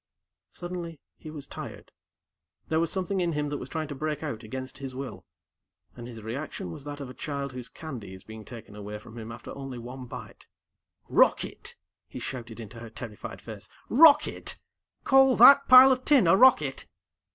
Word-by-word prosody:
Suddenly, 175 -3 -7 0.2
he 155 - -11
was 150 -3 -8
tired, - - -9 0.8
there 160 - +2
was 165 -1 0
something 190 0 -1
in 170 -2 0
him 150 -1 -2
that 145 - -4
was 130 - -8
trying 160 0 -3
to - - -4
break 150 +2 -3
out 120 -8 -4
against 130 +4 -7
his 135 -2 -7
will, 130 -10 -7 0.7
and 120 -1 -9
his 115 -3 -10
reaction 115 - -5
was 135 - -10
that 145 0 -7
of 140 - -6
a 125 - -10
child 140 0 -5
whose 125 -1 -8
candy 120 - -8
is 95 - -14
being 110 0 -10
taken 110 -3 -11
away 105 0 -7
from 110 +2 -14
him 110 +1 -8
after 115 +1 -9
only 135 -2 -7
one 125 +2 -8
bite. - - -10 0.6
"Rocket!" - - +1 0.3
he - - -10
shouted 120 -3 -7
into 115 +1 -9
her 115 0 -9
terrified 110 -1 -8
face. 105 -3 -10 0.2
"Rocket! 295 +3 +5 0.4
Call 270 -1 +5
that 280 0 +8
pile 255 +1 +10
of 255 0 0
tin 270 -9 +5
a 165 - +6
rocket?" 170 - +4
135 Hz, 185 wpm, -27 LUFS, 115-165 Hz, 0.8 s, pile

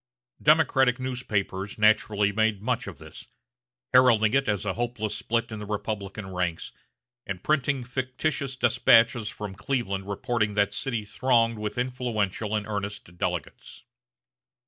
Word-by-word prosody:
Democratic 135 -5 +4
newspapers 105 -6 -3
naturally 105 -1 +3
made 110 0 +1
much 120 +3 -2
of - - -7
this, - - -12 0.7
heralding 115 -4 +5
it 135 -3 +2
as 105 -1 -1
a 95 - 0
hopeless 120 -2 -3
split 115 0 -1
in 110 - -5
the 105 - -6
Republican 100 -2 -4
ranks, 90 -2 -2 0.6
and 95 -2 -5
printing 140 -3 +1
fictitious 130 +3 -2
despatches 115 -2 +4
from 105 -2 -7
Cleveland 100 -3 -2
reporting 105 +1 -1
that 100 -1 +2
city 120 -5 -2
thronged 115 0 +2
with 105 +2 -4
influential 115 -5 -1
and 105 -1 -1
earnest 100 -4 -5
delegates. - - -4
110 Hz, 130 wpm, -26 LUFS, 100-125 Hz, 0.7 s, heralding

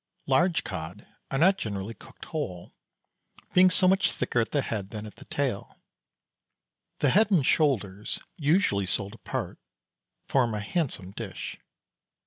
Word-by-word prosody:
Large 170 +6 +3
cod 80 +6 -6 0.2
are 135 - -1
not 190 +6 +5
generally 100 0 -3
cooked - - -13
whole, 95 - -5 0.8
being 185 0 +7
so 185 0 +3
much 190 +1 +4
thicker 120 - -1
at 115 - +1
the 145 -2 +1
head 100 -4 -3
than 105 -1 -6
at 105 - -11
the - - -13
tail. 130 -8 -3 1.2
The 140 - +4
head 215 +6 +5
and 175 -10 +3
shoulders, 105 - +1 0.2
usually 145 - +2
sold 100 +2 -1
apart, 115 - -5 0.7
form 120 -5 +2
a - - -2
handsome 100 - -2
dish. - - -6
125 Hz, 140 wpm, -28 LUFS, 100-165 Hz, 1.2 s, being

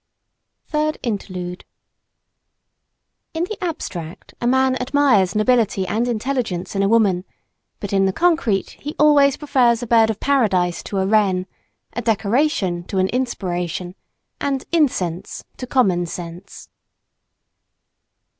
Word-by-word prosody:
THIRD 305 0 0
INTERLUDE 185 -6 -4 1.7
IN 325 - 0
the 405 +1 -5
abstract 180 - -6
a 240 - 0
man 260 +1 +3
admires 250 -8 +2
nobility 215 -3 +2
and 220 +6 -1
intelligence 225 -6 -2
in 195 - +1
a 195 - +3
woman; 200 -5 +3 0.6
but 205 -1 -5
in 195 0 +3
the 190 - +2
concrete 315 - +1
he 295 +2 -6
always 285 -2 +5
prefers 250 -5 +2
a - - -2
bird 225 -1 +4
of 220 - -2
Paradise 195 -11 +1
to 200 - -5
a 190 - +1
wren, 195 -3 +2 0.5
a 240 - -3
decoration 220 - 0
to 195 - -4
an 185 0 +2
inspiration 180 -7 -3 0.5
and 275 -2 -2
incense 190 - 0
to 255 - -6
common 185 -10 +2
sense. 175 +3 -9
220 Hz, 125 wpm, -20 LUFS, 185-265 Hz, 1.7 s, always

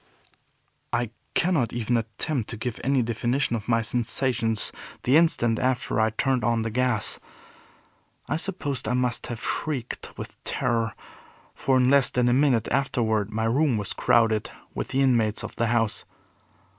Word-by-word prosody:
I 120 -1 -1 0.2
cannot 165 -9 +1
even 120 0 0
attempt 115 +3 -2
to 115 - -5
give 120 +1 -4
any 135 -1 +2
definition 120 +3 0
of 105 -3 -5
my 115 -1 +2
sensations 115 -1 +2 0.3
the 130 - +3
instant 120 -9 +3
after 130 -3 0
I 110 0 +3
turned 130 +3 0
on 115 -1 +1
the 115 - -3
gas. 125 -2 0 1.1
I - - -1
suppose 165 -6 -3
I 125 - +1
must 125 -2 -1
have 120 -2 -5
shrieked 135 -6 -4
with - - -9
terror, 115 -4 -1 0.6
for 130 -1 +1
in 125 -1 +3
less 140 0 +5
than 125 -1 +1
a - - +3
minute 130 -4 +3
afterward 110 -6 0
my 110 +1 -1
room 130 +1 +2
was 105 -2 -3
crowded 110 -2 +2 0.2
with - - -3
the 135 - 0
inmates 115 -5 +2
of - - -7
the 115 - +1
house. 115 -2 0
120 Hz, 155 wpm, -25 LUFS, 115-130 Hz, 1.1 s, less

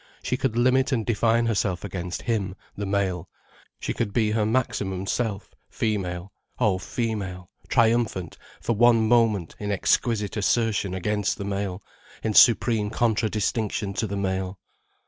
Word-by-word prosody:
She - - 0
could 130 -3 -1
limit 130 +3 +3
and 115 -5 0
define 115 +1 +2
herself 100 -5 0
against 90 -3 -5
him, 100 -6 -1 0.2
the 100 -1 -4
male, 95 -2 -1 0.5
she - - -2
could 105 -4 -2
be 110 -1 +2
her 110 -1 +1
maximum 100 -6 -1
self, 105 -1 -2 0.2
female, 95 -4 -2 0.3
oh 105 -7 +2
female, 95 -4 -4 0.2
triumphant 115 -7 +1 0.3
for 120 - 0
one 115 0 +5
moment 110 -7 +2
in 105 -1 -3
exquisite 105 +1 +1
assertion 105 -3 +1
against 105 +3 -1
the 100 - -5
male, 100 -1 -3 0.4
in 110 - 0
supreme 115 -2 +5
contradistinction 110 -2 0
to 110 - -1
the 100 0 -3
male. 95 -1 -2
105 Hz, 140 wpm, -25 LUFS, 95-115 Hz, 0.5 s, one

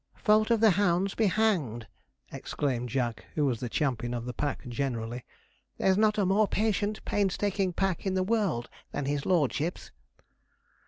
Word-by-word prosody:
'Fault 215 +1 +3
of 230 -2 +3
the 220 -2 +7
hounds 190 +1 +1
be 220 - +2
hanged!' 175 - +1 0.5
exclaimed 125 -4 -2
Jack, 120 -2 -2
who 150 - +2
was 125 -5 0
the 125 - -4
champion 120 -3 -1
of 120 -1 -4
the 125 - -4
pack 145 -2 -3
generally. 120 -2 -3 0.5
'There's 190 - +3
not 215 +1 +3
a 205 - +2
more 200 +3 +3
patient, 215 0 -1
painstaking 200 -1 0
pack 190 0 -1
in 190 -1 -1
the 185 - +2
world 190 - 0 0.2
than 145 - -3
his 140 0 -2
lordship's.' 165 -1 0
175 Hz, 160 wpm, -29 LUFS, 125-205 Hz, 0.5 s, the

